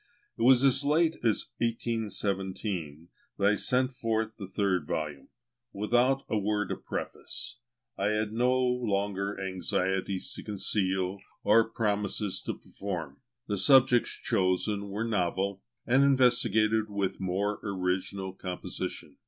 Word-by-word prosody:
It - - -8
was 125 +2 +6
as 135 0 +4
late 160 +3 +2
as 110 -3 +1
1817 100 -8 -2 0.3
that 100 - +3
I - - +2
sent 130 +3 +1
forth 110 -3 -1
the 100 -3 -7
third 95 -5 0
volume; 75 -3 -3 0.5
without 120 +6 +2
a 110 - 0
word 105 0 -1
of - - -5
preface. 120 - -5 0.4
I 100 - +1
had 105 0 0
no 125 +2 +2
longer 100 -5 0
anxieties 95 0 -1
to - - -7
conceal 95 -2 -1 0.2
or 115 0 +5
promises 105 -2 -1
to - - -1
perform. 85 -8 -6 0.2
The 100 -2 -1
subjects 125 +2 +5
chosen 100 +2 0
were 105 +3 -2
novel, 100 -2 -1 0.2
and 130 +4 +4
investigated 115 -5 +3
with 100 -2 -2
more 100 +2 -1
original 95 0 -2
composition. 90 -1 -5
105 Hz, 125 wpm, -29 LUFS, 95-115 Hz, 0.5 s, was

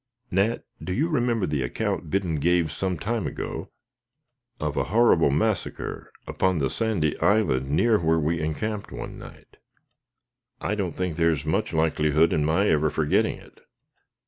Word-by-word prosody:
"Nat, 100 +5 +1 0.2
do 90 - -3
you 150 - +1
remember 120 - +1
the 75 -4 -1
account 60 +4 -2
Biddon 90 -2 0
gave 85 +1 +2
some 90 +5 -2
time 115 0 -2
ago - - -5 0.9
of 75 -1 -2
a - - 0
horrible 105 -7 +4
massacre, 90 +8 -2
upon 95 -2 0
the 70 -4 0
sandy 105 -10 0
island 80 -9 +2
near 110 +9 +3
where 80 0 +2
we 80 +1 0
encamped 100 +7 -3
one - - -7
night?" - - -14 1.0
"I 105 - -2
don't 100 -5 -2
think 90 -3 -2
there 85 -1 +3
is 75 -2 -1
much 95 +8 0
likelihood 80 0 +2
of 75 - +1
my 85 +7 +2
ever 75 0 +3
forgetting 75 0 +1
it." - - -18
85 Hz, 155 wpm, -25 LUFS, 75-105 Hz, 1.0 s, horrible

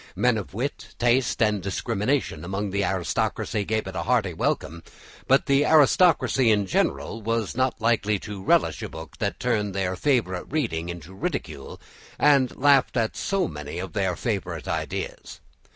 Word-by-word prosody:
Men 120 +5 +2
of 100 - -9
wit, 135 +6 -4
taste, 120 0 +2
and 105 -2 +1
discrimination 100 - -1
among 100 +3 -3
the 100 +1 0
aristocracy 95 +2 -1
gave 110 +2 -1
it - - -7
a - - -1
hearty 110 -7 +1
welcome, 80 0 -2 0.5
but 135 +1 +4
the 140 0 +3
aristocracy 150 -4 +4
in 105 -2 +3
general 90 +4 -1
were 115 +1 0
not 130 +1 0
likely 110 -2 +1
to 100 0 -8
relish - - +2
a - - -5
book 80 -2 -10
that - - -2
turned 105 -5 -1
their 95 -1 -1
favourite 100 -7 0
reading 100 - -1
into 85 +1 -8
ridicule 85 - -5 0.4
and 140 -3 +3
laughed 140 -2 +3
at 115 -2 0
so 195 -1 0
many 75 0 -7
of 95 +1 -5
their 95 -4 0
favourite 90 - -3
ideas. - - -4
105 Hz, 160 wpm, -25 LUFS, 95-125 Hz, 0.5 s, but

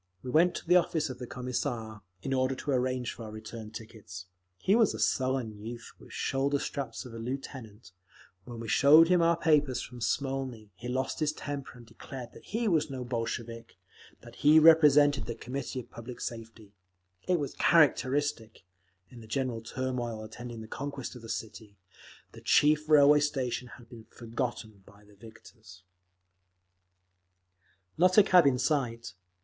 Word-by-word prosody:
We 125 - -5
went 170 +4 +4
to - - -7
the 180 +1 +6
office 160 -4 0
of 125 - -10
the 125 - -6
Commissar, 120 -3 -4 0.2
in 135 - -2
order 130 0 +1
to 145 - -4
arrange 130 -1 -1
for 115 - -9
our 110 - -8
return 110 0 -8
tickets. 110 -4 -10 0.3
He 195 - +2
was 225 - +3
a - - -7
sullen 120 -2 -1
youth 120 +1 -8
with - - -15
the - - -17
shoulder 140 +1 0
straps 135 -3 -5
of 125 - -10
a 115 - -7
Lieutenant; 120 -4 -7 0.5
when 120 -2 -8
we 115 - -6
showed 155 +8 +6
him 180 -1 +4
our 165 0 +3
papers 150 -6 +2
from 125 -1 -8
Smolny, 130 -2 -3
he 115 +6 -8
lost 130 +2 -2
his 155 -1 +1
temper 145 -4 -7
and 120 - -14
declared 125 +1 -10
that - - -15
he 225 +2 -2
was 160 -6 +1
no 130 -2 -5
Bolshevik, 115 -1 -5 0.5
that - - -14
he 150 +2 +5
represented 150 -5 +6
the 115 - -4
Committee 130 +2 -5
of - - -20
Public 115 +1 -9
Safety…. 115 -3 -8 0.5
It 180 -2 +2
was 140 -2 -4
characteristic—in 115 - 0
the 110 - -13
general 120 -1 -2
turmoil 120 -2 -4
attending 115 +1 -8
the 110 - -9
conquest 140 +1 -6
of 125 - -10
the 115 - -11
city, 110 -2 -7 0.5
the - - -13
chief 150 +1 +3
railway 150 -1 +7
station 130 -4 -2
had 120 - -16
been 115 -2 -13
forgotten 115 -3 -5
by 100 +1 -19
the 105 - -20
victors…. 110 -3 -15 2.2
Not 185 +2 +4
a 210 - +9
cab 180 -6 +5
in 130 -2 +3
sight. 120 - -1
125 Hz, 165 wpm, -29 LUFS, 115-145 Hz, 2.2 s, a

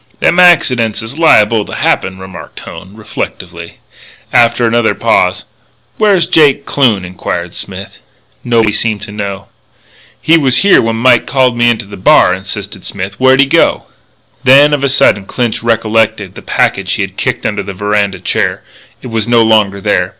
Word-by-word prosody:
"Them 175 - +1
accidents 125 -12 +3
is 115 +8 -9
liable 110 -9 +3
to - - -9
happen," 95 0 -1
remarked 95 0 -11
Hone, 90 +5 -12
reflectively. 90 -5 -8 0.6
After 120 0 +3
another 115 0 0
pause: - - 0 0.5
"Where's 200 -6 +2
Jake 150 -5 +2
Kloon?" 115 -9 0
inquired 90 -1 -6
Smith. 95 0 -8 0.4
Nobody 115 -3 +1
seemed 110 -1 -2
to - - -8
know. 100 -1 -6 0.7
"He 165 +1 +3
was 130 -4 +2
here 200 - +5
when 115 0 -2
Mike 120 +1 +2
called 130 -3 +1
me 120 0 +2
into 115 -3 -2
the 100 0 -11
bar," 90 0 +3
insisted 100 +1 -7
Smith. 100 0 -6
"Where'd 130 +1 +4
he - - +4
go?" 135 - +1 0.6
Then, 140 +3 +5
of 140 -1 -1
a 140 - +1
sudden, 105 -7 +2
Clinch 120 -3 -3
recollected 110 -4 -1
the - - -11
packet - - -1
which - - -2
he - - -1
had - - -7
kicked - - -3
under - - -2
a - - -7
veranda 105 -1 -2
chair. 90 - -2 0.4
It - - -7
was 115 -1 -2
no 120 -1 +3
longer 105 -3 +1
there. 95 -3 -1
110 Hz, 170 wpm, -11 LUFS, 100-130 Hz, 0.7 s, here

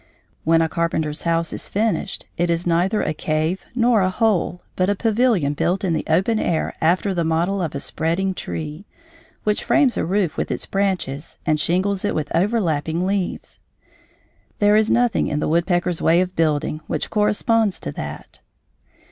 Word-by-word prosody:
When 165 +1 +4
a - - +1
carpenter's 160 -2 -1
house 165 -1 0
is - - -5
finished, 210 -1 -1
it 175 0 0
is 170 +1 0
neither 180 +5 +1
a 155 - -1
cave 155 +4 -1
nor 235 -3 +3
a 185 - +2
hole, 185 -3 0
but 185 +1 +1
a 205 - +2
pavilion 220 - +2
built 180 +6 0
in 180 -3 +1
the - - -1
open 190 +8 +2
air 160 - -1
after 185 +5 +2
the 170 -2 0
model 170 +5 0
of 160 -5 -3
a - - -2
spreading 170 +7 -1
tree, 155 +1 -6 0.6
which 210 0 0
frames 270 -5 +3
a - - 0
roof 185 -1 0
with - - -2
its - - -3
branches 185 -7 -2
and 155 -2 +2
shingles 185 +5 +1
it 205 - 0
with 155 0 -2
overlapping 170 -4 0
leaves. 195 -1 -3 1.0
There 205 0 +4
is 220 0 +3
nothing 240 -1 +2
in 150 - -1
the - - -1
woodpecker's 175 +1 +1
way 165 +2 +4
of 185 0 -1
building 155 -1 0
which - - -3
corresponds 210 -1 +1
to 75 - -4
that. - - -8
180 Hz, 175 wpm, -21 LUFS, 160-205 Hz, 1.0 s, When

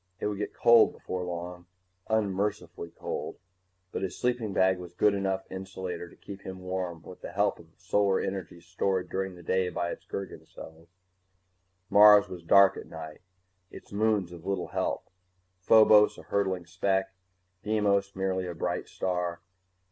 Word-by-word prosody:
It - - -3
would 105 -1 -2
get 105 - -4
cold 115 -1 +6
before 90 0 -5
long, 90 0 -6 0.4
unmercifully 105 -4 -1
cold, 85 - -5 0.5
but - - -4
his 95 -1 -4
sleeping 120 -4 -1
bag 95 -1 +2
was 90 -1 -9
a - - -39
good 105 +3 +3
enough 95 -1 -1
insulator 95 -2 -6
to - - -18
keep 100 0 -10
him 95 -1 -7
warm 90 -3 -4
with 90 - -12
the - - -7
help - - +1
of - - -15
solar 100 -2 +1
energy 95 -3 -5
stored 95 +2 -1
during 95 -1 -3
the 90 - -13
day 95 +1 +1
by 85 -1 -2
its - - -8
Gergen 100 -1 -6
cells. 80 +1 -13 1.0
Mars 105 0 +8
was 90 -2 -8
dark 100 +3 +6
at - - -8
night, 80 -1 -9 0.5
its - - -13
moons 105 -4 +1
of 85 -2 -11
little 95 -1 -2
help - - -2 0.5
Phobos 105 +2 +6
a - - -11
hurtling 95 -3 -1
speck, 95 +3 -1 0.5
Deimos 100 -2 +1
merely 95 -1 -1
a 85 - -5
bright - - -2
star. 90 -2 -2
95 Hz, 165 wpm, -28 LUFS, 90-100 Hz, 1.0 s, Mars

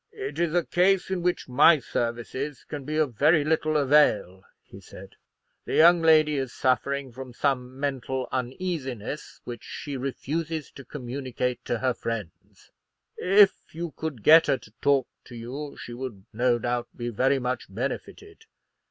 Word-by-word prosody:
"It 415 -2 -6
is 170 -1 0
a 175 - +2
case 190 +1 +2
in 185 -2 -1
which 180 0 -1
my 145 +6 +6
services 125 +3 -4
can 145 -3 -7
be 155 +2 -3
of 150 -5 +1
very 150 +6 +4
little 155 0 +1
avail," 135 -10 +3 0.2
he - - -14
said; - - -12 0.6
"the - - -3
young 170 +1 +6
lady 155 -2 +5
is 135 -3 -2
suffering 135 +2 0
from 130 +1 -9
some 130 -1 -1
mental 130 -2 -2
uneasiness, 130 - -4
which 120 -2 -8
she 140 -2 -6
refuses 155 +4 -4
to 140 - -11
communicate 125 -2 -4
to 120 - -1
her 130 +2 0
friends. 110 -8 -7 0.4
If 195 +2 +5 0.2
you 170 0 -4
could 150 -9 -5
get 160 +1 +7
her 135 - +2
to 110 - -17
talk 140 -3 +3 0.2
to 120 - -11
you, 130 +6 -7
she 120 - -8
would 120 -6 -7
no 120 +2 +2
doubt 120 +1 -2
be 120 0 -3
very 130 +5 +2
much 125 -1 -3
benefited. 400 - -6
135 Hz, 160 wpm, -26 LUFS, 125-155 Hz, 0.6 s, get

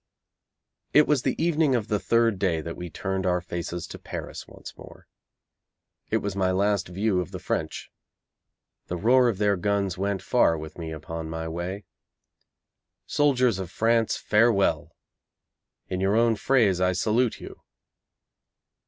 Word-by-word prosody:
It 150 - +7
was 150 -4 +2
the - - -2
evening 160 -4 +2
of 115 -3 -1
the 105 -2 0
third 115 -3 +2
day 90 -4 +1
that 85 +1 -6
we 90 0 -7
turned 95 +1 -3
our 90 0 +2
faces 85 -1 -5
to - - -10
Paris - - -7
once - - -11
more. - - -14 1.0
It - - 0
was 100 -2 -2
my 95 -1 +1
last 100 +1 +1
view 95 +1 0
of 90 - -6
the - - -6
French. - - -4 1.0
The 90 - -3
roar 125 +6 +4
of 110 - -2
their 100 0 +2
guns 100 0 -1
went 100 -1 -1
far 100 -10 +3
with 80 0 -8
me 80 -1 -5
upon 80 +1 -6
my 80 0 -4
way. 90 +5 -5 1.2
Soldiers 130 -8 +2
of 95 -3 -5
France, 115 +4 +1
farewell! 105 -8 +2 1.0
In 95 0 -3
your 100 +2 +2
own 115 0 +3
phrase 105 -6 +2
I 90 0 +3
salute 110 +5 +1
you! - - -11
100 Hz, 155 wpm, -26 LUFS, 90-115 Hz, 1.2 s, It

